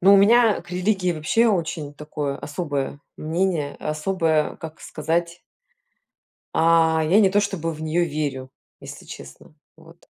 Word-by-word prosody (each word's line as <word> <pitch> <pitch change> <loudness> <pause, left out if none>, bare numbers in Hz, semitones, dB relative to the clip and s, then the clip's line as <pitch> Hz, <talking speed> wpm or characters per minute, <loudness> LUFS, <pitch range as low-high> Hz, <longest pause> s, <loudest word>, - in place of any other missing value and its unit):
Ну, 195 +2 +7
у - - +8
меня 220 +2 +5
к - - -16
религии 185 0 0
вообще 200 +10 +2
очень 165 -6 -2
такое 145 -1 -4
особое 145 -3 -4 0.2
мнение, 160 -2 -1
особое, 155 0 0
как 160 0 -9
сказать 170 +2 -2 1.1
А, 160 -1 +4
я 200 +5 +6
не 195 - +5
то 205 +2 +3
чтобы 180 -5 -2
в 155 - -10
нее 160 +2 +1
верю, 145 -4 -4 0.3
если - - -10
честно. 70 - -12 0.2
Вот. - - -19
165 Hz, 140 wpm, -23 LUFS, 150-185 Hz, 1.1 s, у